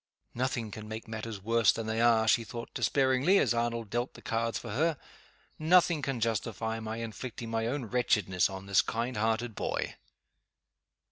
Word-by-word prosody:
"Nothing 120 -3 -2
can 105 +1 -8
make 110 +1 -6
matters 110 -2 -6
worse 115 -1 +4
than 115 - -4
they 110 +1 -1
are," 115 -2 +4
she 115 - +4
thought, 115 +2 -8
despairingly, 135 +7 +3
as - - +3
Arnold 115 -2 -2
dealt 120 +2 -2
the - - -12
cards 115 0 -1
for 115 - -7
her. 155 +6 +1 0.6
"Nothing 170 0 +4
can 135 -3 -2
justify 110 0 -1
my 110 0 -5
inflicting 115 0 -6
my 115 0 0
own 130 +1 -2
wretchedness 105 -6 +2
on 95 0 -7
this 100 -1 +4
kind 120 +2 -2
hearted 110 +2 0
boy!" - - -2
115 Hz, 165 wpm, -30 LUFS, 110-120 Hz, 0.6 s, worse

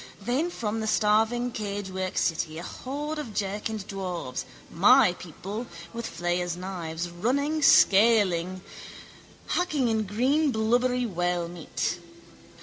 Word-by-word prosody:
Then 250 - 0
from 225 -9 -3
the 220 - -2
starving 225 +4 +2
cagework 200 -3 -4
city 160 -1 0
a 170 - -6
horde 295 +9 -5
of 230 -9 -7
jerkined 210 +1 -3
dwarfs, 180 -9 -4 0.3
my 210 +3 +6
people, 195 +7 -7 0.3
with 230 0 -4
flayers' 175 +1 -2
knives, 175 -2 -4
running, 270 - 0
scaling, 190 -7 +4 0.9
hacking 305 -9 +1
in 220 -1 0
green 265 +9 +2
blubbery 245 +2 +1
whalemeat. 175 -2 -2
210 Hz, 110 wpm, -27 LUFS, 180-245 Hz, 0.9 s, my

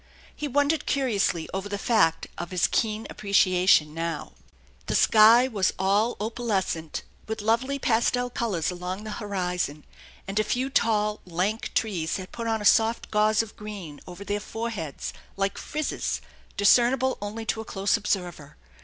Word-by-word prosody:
He 300 - -3
wondered 285 +3 +1
curiously 210 - 0
over 195 +1 -3
the 205 - -2
fact 200 -6 +2
of 175 0 -6
his 180 -2 +1
keen 220 -1 0
appreciation 185 -6 +3
now. 165 +1 -4 0.6
The - - 0
sky 225 +3 +6
was 200 -7 0
all 205 +5 +1
opalescent 205 -8 -2 0.2
with 220 0 -3
lovely 235 +6 +1
pastel 245 0 +1
colors 200 -9 -1
along 180 +3 -5
the 215 - -6
horizon, 180 -7 -2 0.4
and 195 +2 -1
a - - +3
few 255 +5 -1
tall, 210 -4 +1
lank 185 +6 -2
trees 180 -7 0
had 185 -1 -8
put 230 -1 -5
on 220 -2 -1
a - - -5
soft 225 +2 +3
gauze 215 +1 +3
of 220 - -12
green 200 -9 -8
over 180 +2 -9
their 205 +1 -1
foreheads 215 - -5 0.2
like 195 0 -1
frizzes, 305 0 -2 0.4
discernible 250 +5 +4
only 215 +2 -5
to 220 - -1
a - - -9
close 195 -1 0
observer. 180 -9 -3
210 Hz, 155 wpm, -26 LUFS, 185-230 Hz, 0.6 s, sky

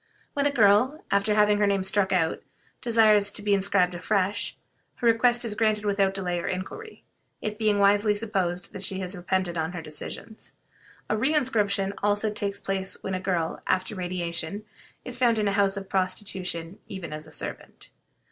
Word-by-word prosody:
When 285 0 +2
a - - 0
girl, 240 +5 +4
after 200 +1 +2
having 210 -1 +4
her 205 - +3
name 200 -1 +2
thus 190 - -1
struck 200 -2 +1
out, 165 -4 +1 0.4
desires 215 -4 +4
to 210 - -5
be 205 -1 +2
inscribed 195 -2 +2
afresh, 195 +2 -1 0.4
her - - -5
request 240 +1 +4
is 220 - -2
granted 215 -1 +1
without 195 -1 +1
delay 180 -2 -1
or - - -4
inquiry, 430 - -6 0.4
it 210 0 -4
being 215 -2 +2
wisely 205 +1 +4
supposed 190 -5 -2
that 195 - -7
she 190 0 -1
has 185 +1 -3
repented 180 -1 -1
of 160 +3 -2
her 175 - -5
decision. 155 +8 -6 0.7
A - - 0
re 265 +8 +1
inscription 205 -8 +1
also 205 +1 +1
takes 200 -1 -3
place 195 0 -3
when 190 - -3
a 185 - -1
girl, 175 -4 -1
after 185 +3 0
radiation, 180 +1 -3 0.4
is 245 -1 -6
found 235 -3 +3
in 210 -1 +1
a - - +2
house 200 -1 +2
of 195 -1 -6
prostitution 185 -2 -2
even 185 -5 -7
as 155 +1 -6
a - - -14
servant. - - -7
200 Hz, 185 wpm, -26 LUFS, 185-215 Hz, 0.7 s, girl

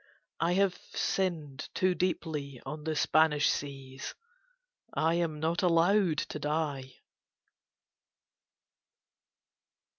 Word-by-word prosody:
I 170 +2 +2
have 195 -1 +3 0.2
sinned 160 -8 -1
too 185 -1 +3
deeply 155 -7 -2
on 150 +3 -6
the 160 -1 -1
Spanish 150 -1 +4
seas: 135 -2 -5 0.8
I 160 +1 +2
am 165 -3 0
not 165 +2 0
allowed 175 0 +4
to 150 - -3
die." 145 -4 -2
155 Hz, 90 wpm, -31 LUFS, 145-175 Hz, 0.8 s, Spanish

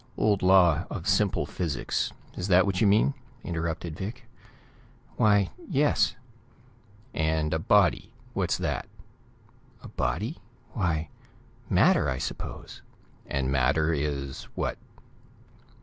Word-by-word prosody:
Old 105 -2 +2
law 90 -3 +5
of 90 +1 -5
simple 100 0 +2
physics. 80 -6 -2 0.2
Is 90 - -3
that 90 -1 +5
what 95 -2 -1
you 110 - +5
mean?" 105 +7 +4 0.3
interrupted 85 -1 -3
Vic. 115 +8 -6 0.9
"Why, 105 -3 +3 0.2
yes." 130 -7 +2 1.0
"And 80 0 0
a 80 - +1
body; 100 +2 +3 0.2
what's - - 0
that?" - - -2 1.0
"A - - -9
body? 110 - -2 0.3
Why, 80 -7 -1 0.6
matter, - - +4
I 65 - -1
suppose." - - -6 0.5
"And 65 -1 -1
matter 70 +5 +2
is 70 -3 -3
what?" - - -2
90 Hz, 110 wpm, -27 LUFS, 80-100 Hz, 1.0 s, law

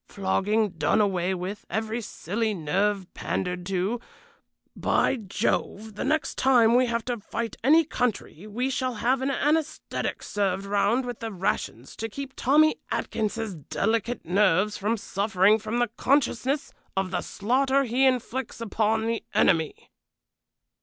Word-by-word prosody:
Flogging 205 +2 +1
done 170 +5 +1
away 190 -3 +1
with; 185 +3 -5
every 220 +4 -2
silly 215 +1 -2
nerve 190 +5 0
pandered 180 -1 -3
to. 195 +5 -1 0.8
By - - +2
Jove! 215 +1 -2
the 210 - -4
next 305 +3 0
time 240 -4 +5
we 250 +1 +4
have 230 -1 -1
to 245 -2 -2
fight 230 +2 -4
any 315 +5 +5
country 220 - -2
we 245 +5 -2
shall 255 -1 -1
have 250 +4 +1
an 265 - 0
anæsthetic 305 +3 -1
served 195 -1 -1
round 205 +5 +1
with 245 -2 -5
the 225 -1 -4
rations 175 - -3
to 225 - -3
keep 275 +4 -7
Tommy 305 +4 +4
Atkins's 220 -1 -2
delicate 200 - -2
nerves 195 +2 +3
from 215 +3 0
suffering 200 +1 +2
from 220 +2 -3
the 240 -2 +1
consciousness 275 +1 +1 0.2
of 190 -1 0
the 185 - -1
slaughter 265 +6 +1
he 260 +2 +3
inflicts 255 0 -2
upon 220 0 0
the 230 0 -1
enemy." 160 -3 +2
220 Hz, 140 wpm, -26 LUFS, 195-250 Hz, 0.8 s, time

